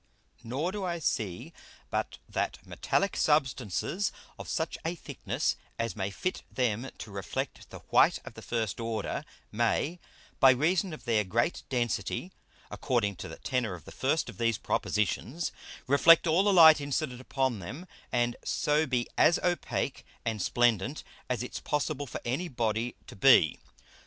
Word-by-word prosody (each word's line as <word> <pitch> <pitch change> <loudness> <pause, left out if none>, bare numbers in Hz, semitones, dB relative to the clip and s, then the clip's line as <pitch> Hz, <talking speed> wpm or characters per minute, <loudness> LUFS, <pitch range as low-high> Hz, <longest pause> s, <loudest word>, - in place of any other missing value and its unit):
Nor 140 +10 -2
do 205 0 -4
I 175 -2 -1
see 120 - -2 0.4
but - - -2
that - - -2
metallick 195 -1 0
Substances 140 - +1 0.3
of - - -7
such 160 -1 -1
a 165 +2 -2
Thickness - - -2 0.2
as 115 -1 -2
may 95 -2 -2
fit 185 - -3
them 125 0 0
to 105 - -8
reflect 100 -2 -4
the - - -10
white - - +5
of - - -8
the - - -10
first 115 -4 -2
order, 115 -1 -2 0.3
may, 120 +9 0 0.4
by 135 - +8
reason 165 +8 +2
of 130 -6 -9
their 110 -3 +2
great 115 - 0
Density 125 +8 -1 0.4
(according 115 -7 0
to - - -6
the - - -9
Tenor 125 -7 -1
of 85 - -13
the - - -10
first - - 0
of - - -10
these 115 -2 +2
Propositions) 115 - -1 0.3
reflect 155 +5 +6
all 170 +3 +4
the 205 - +3
Light 160 -5 +8
incident 140 -3 -2
upon 130 -4 -1
them, 120 - -7 0.3
and 120 0 +1
so 150 +1 +1
be 125 -2 0
as 170 - +6
opake 175 -1 -1 0.2
and 110 -3 -1
splendent 120 +5 +1 0.3
as 125 -1 -1
it's 125 - -5
possible 145 -1 -2
for 110 - -6
any 135 +10 -1
Body 120 -3 -1
to - - -11
be. 95 - +5
125 Hz, 155 wpm, -29 LUFS, 115-160 Hz, 0.4 s, by